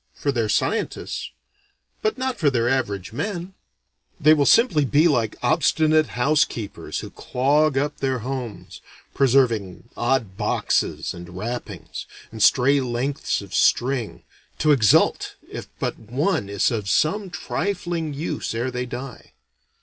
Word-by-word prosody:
For 140 - -1
their 115 -5 -1
scientists. 105 - -1 0.7
But 215 - 0
not 260 -1 -2
for 150 - +4
their 120 -3 0
average 105 -7 -1
men: 185 - -4 0.7
they 155 0 +6
will 145 -2 +2
simply 230 - +5
be 145 +5 +4
like 115 -9 +1
obstinate 155 -2 +2
housekeepers 125 -5 0
who - - -9
clog 140 +3 +1
up 145 +2 -1
their 130 -1 -1
homes, 125 -5 -6 0.3
preserving 115 -7 +1
odd 120 -6 0
boxes - - 0
and 85 +1 -10
wrappings, 120 +5 -6 0.2
and 110 -1 -7
stray 135 +6 +5
lengths 130 +3 -2
of - - -12
string, 125 -3 +1 0.3
to 155 - +3
exult 110 -8 +3 0.2
if - - -7
but - - -3
one 120 - -1
is 100 +3 +1
of 105 -4 -2
some 195 - +1
trifling 175 -4 -3
use 145 -5 -4
ere 120 +3 -1
they 125 0 -3
die. 125 0 -8
135 Hz, 135 wpm, -23 LUFS, 115-155 Hz, 0.7 s, they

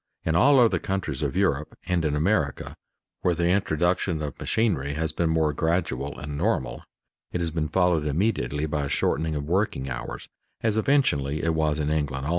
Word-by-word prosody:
In 80 - +1
all 135 +9 +6
other 115 -2 +4
countries 95 -8 -3
of - - -1
Europe 75 -7 0
and 90 -2 0
in 75 -2 0
America, 75 -3 0 0.5
where 90 - +2
the 85 +1 +1
introduction 90 -2 +1
of 70 -4 -4
machinery 75 -11 0
has 80 0 -1
been 85 +1 0
more 80 -2 +2
gradual 75 -4 -1
and 75 -1 -6
normal, - - -1 0.5
it 90 - -2
has 85 -1 -1
been 80 -1 -1
followed 85 -2 +2
immediately 75 - 0
by 75 -2 -1
a - - -4
shortening 80 +2 0
of 75 - -2
working 80 -5 -1
hours, - - -6 0.3
as 110 -2 +1
eventually 95 - +1
it 80 0 +1
was 80 -2 +1
in 75 0 -1
England 70 -3 -1
also. - - -2
80 Hz, 185 wpm, -25 LUFS, 75-90 Hz, 0.5 s, all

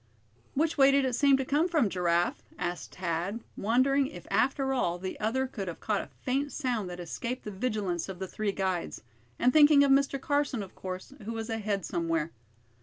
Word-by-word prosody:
"Which 315 +1 +1
way 270 0 +8
did 275 0 +4
it 255 - 0
seem 275 +2 +5
to 265 - -2
come 295 +6 +2
from, 310 - +2
Giraffe?" 175 -2 +1 0.2
asked 175 0 -4
Thad, 180 +5 -2
wondering 260 +6 +2
if 290 - -10
after 270 +1 +2
all 175 -9 0
the 185 +1 -6
other 235 +5 0
could 215 -7 -5
have 170 - -5
caught 210 -2 0
a - - -9 0.2
faint 275 +3 0
sound 240 -9 -2
that 175 0 -7
escaped 235 +9 -4
the 210 - -5
vigilance 195 -4 -2
of 190 - -6
the 190 +1 -4
three 210 +2 -2
guides; 190 - -2 0.3
and 250 - +3
thinking 295 -2 +7
of 280 - +3
Mr. 275 0 +3
Carson, 285 -6 0
of 190 - -11
course, 185 +7 -7
who 225 +3 -4
was 225 0 -4
ahead 205 -4 -1
somewhere. 165 -1 -1
225 Hz, 195 wpm, -29 LUFS, 185-275 Hz, 0.3 s, way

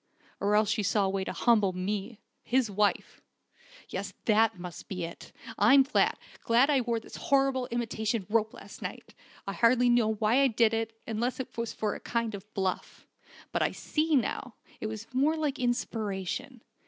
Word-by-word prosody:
Or 205 +1 +2
else 210 -1 +3
she 220 - +1
saw 200 0 +2
a - - +1
way 195 0 -1
to - - -3
humble 210 -6 +3
me 200 +4 -3 0.2
his 245 -3 +1
wife. 205 +1 0 0.7
Yes, 195 +1 -5
that 220 -1 +3
must 180 -1 -8
be 185 -2 -4
it! 165 0 -8 0.3
I'm 265 +7 +7
glad 275 - +2 0.3
glad 245 +5 +4
I 275 -3 +3
wore 235 -1 -1
the - - -12
horrid 270 -2 +2
imitation 225 -3 -1
rope 220 0 +1
last - - -12
night. - - -7 0.3
I 195 - -2
hardly 245 +3 +4
knew 240 -2 +4
why 220 +3 +2
I 275 - +5
did 230 -2 +3
it, 225 0 -2
unless 235 +4 -2
it 260 - -6
was 230 -1 -3
for 210 -1 -1
a - - -7
kind 230 -2 -2
of 200 +1 -9
bluff. 190 -2 -3 0.5
But - - 0
I - - +1
see 310 0 0
now, 250 -1 -1 0.2
it - - -3
was 220 0 -6
more 290 +5 +2
like 295 -3 -1
inspiration. 235 0 -2
225 Hz, 180 wpm, -29 LUFS, 205-245 Hz, 0.7 s, I'm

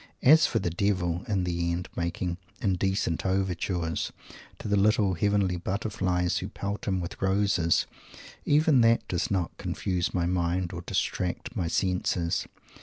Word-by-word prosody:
As 155 +4 +7
for - - -1
the 85 - -1
Devil, 90 -2 0
in 100 -4 0
the 85 -1 -1
end, 90 +1 -3
making 85 +1 -2 0.2
"indecent 95 -4 0
overtures" 90 -3 -1 0.5
to - - -7
the 105 - +2
little 100 -1 +3
Heavenly 100 0 +1
Butterflies, 95 -2 -1
who - - -4
pelt 100 +1 -5
him 95 -2 +1
with 85 0 -6
roses 95 -3 +2 0.6
even 150 -3 +4
that 115 0 +3
does 90 -1 -1
not 90 -4 -1
confuse 90 -3 -1
my 90 -2 0
mind 90 0 0
or 85 - -5
distract 90 0 -2
my 85 - -1
senses. 90 -1 0
95 Hz, 145 wpm, -28 LUFS, 85-100 Hz, 0.6 s, As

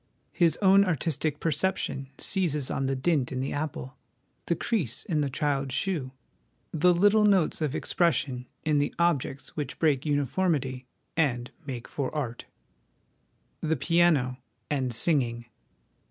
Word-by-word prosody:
His 165 -3 +2
own 195 +1 +7
artistic 155 -3 -1
perception 155 -4 -1
seizes 155 -8 +1
on 135 - -1
the 135 - 0
dint 135 -1 +1
in 130 - -3
the 135 - -2
apple, 145 -3 -5 0.5
the 170 - +2
crease 165 - -1
in 160 -7 0
the 140 - 0
child's 135 -1 -1
shoe, 165 -10 -1 0.6
the 175 +3 +4
little 205 +5 +4
notes 195 -6 +3
of 150 -4 -1
expression 140 -7 0 0.2
in 150 -2 +3
the 145 - -1
objects 150 -5 0
which 145 -4 -4
break 145 -5 +2
uniformity 145 -3 0 0.3
and 125 -7 0 0.2
make 125 -3 -5
for 140 -3 -3
art. 120 -5 -4 1.2
The 160 0 +1
Piano 145 -4 +2 0.3
and 130 -4 0
Singing. 120 -3 0
145 Hz, 135 wpm, -27 LUFS, 130-170 Hz, 1.2 s, own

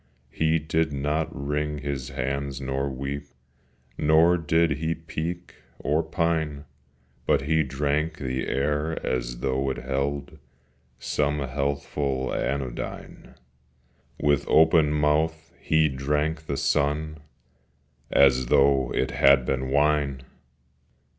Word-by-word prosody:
He 80 +2 +2
did 80 0 0
not 75 +3 -1
wring 75 +2 -2
his 70 -2 -4
hands 70 +1 -3
nor 70 +1 -2
weep, 70 +2 -5 0.7
Nor 80 +3 +5
did 80 -2 +1
he 80 +1 -1
peek 80 +2 -5 0.2
or 75 +3 +1
pine, 80 -3 -1 0.6
But - - +3
he 80 +2 +2
drank 75 +3 -1
the 65 -2 -3
air 75 +3 -1
as - - -2
though 65 0 0
it 65 - -3
held 70 +3 -3 0.6
Some 75 +4 -1
healthful 70 -1 -2
anodyne; 65 -3 -4 0.8
With 70 -2 +1
open 80 -1 +5
mouth 75 +2 0
he 80 0 +3
drank 75 +3 -2
the 70 - -2
sun 75 +1 0 0.9
As 65 -2 +4
though 70 -1 +3
it 65 - 0
had 70 +1 +5
been 65 0 -1
wine! 70 -2 +1
70 Hz, 110 wpm, -25 LUFS, 70-80 Hz, 0.9 s, Nor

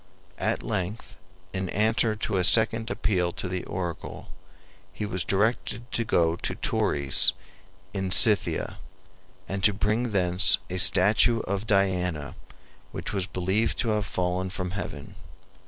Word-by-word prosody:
At - - -1
length, 95 +5 -4 0.4
in 95 -1 -3
answer 110 +2 +1
to 105 -1 -2
a 90 - +1
second 110 +3 +3
appeal 90 -7 0
to - - -5
the 90 0 -3
oracle, 90 -4 -6 0.6
he 105 - -5
was 95 -4 -2
directed 115 +4 -1
to 115 - 0
go 85 -6 +2
to - - -3
Tauris 70 -1 +1 0.6
in 95 -2 -3
Scythia, 105 +1 +3 0.7
and 95 0 -4
to 105 0 +5
bring 110 +4 0
thence 90 -2 +3
a 90 - -2
statue 105 +5 +5
of 100 +3 -4
Diana 90 - 0 0.6
which - - -4
was 95 -2 -1
believed 95 +4 -1
to 115 - -1
have 105 -1 0
fallen 90 0 -1
from 90 -1 -4
heaven. 90 -4 -6
95 Hz, 140 wpm, -26 LUFS, 90-110 Hz, 0.7 s, to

